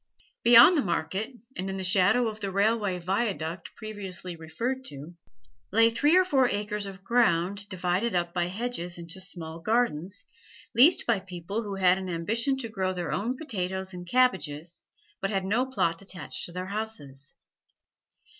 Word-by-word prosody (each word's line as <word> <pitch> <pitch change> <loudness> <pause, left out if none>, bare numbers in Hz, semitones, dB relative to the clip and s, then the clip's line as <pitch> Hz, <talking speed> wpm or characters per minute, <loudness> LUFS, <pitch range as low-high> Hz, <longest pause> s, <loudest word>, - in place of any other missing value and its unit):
Beyond 240 +9 +9
the 300 - +3
market, 190 +4 -2 0.2
and 190 +1 -3
in 190 - -3
the 190 - -4
shadow 200 +6 +4
of 215 -1 -5
the 200 -2 -3
railway 200 -1 +1
viaduct 180 -3 -2
previously 190 -5 -6
referred 230 - -3
to, 145 - -9 0.6
lay 225 +3 +5
three 295 +9 +4
or 370 - +5
four 270 -8 +3
acres 210 0 -2
of 195 0 -10
ground 200 -3 +2
divided 185 +3 0
up 175 -1 0
by 175 -1 +1
hedges 180 -3 -4
into 170 +2 -9
small 165 -3 -5
gardens, 200 -4 0 0.5
leased 270 +10 +6
by 230 -4 +2
people 185 +3 -5
who 205 -3 -5
had 185 -1 +4
an 190 -1 -5
ambition 225 +11 0
to 255 -3 -4
grow 190 -4 -2
their 175 -5 -3
own 215 +11 -1
potatoes 190 - -3
and 180 0 -8
cabbages, 175 -10 +1 0.4
but 195 - 0
had 195 -2 -1
no 235 +7 +1
plot 170 -10 0
attached 190 -2 -5
to - - -11
their 180 +1 -4
houses. 185 -10 -5
195 Hz, 165 wpm, -28 LUFS, 175-225 Hz, 0.6 s, Beyond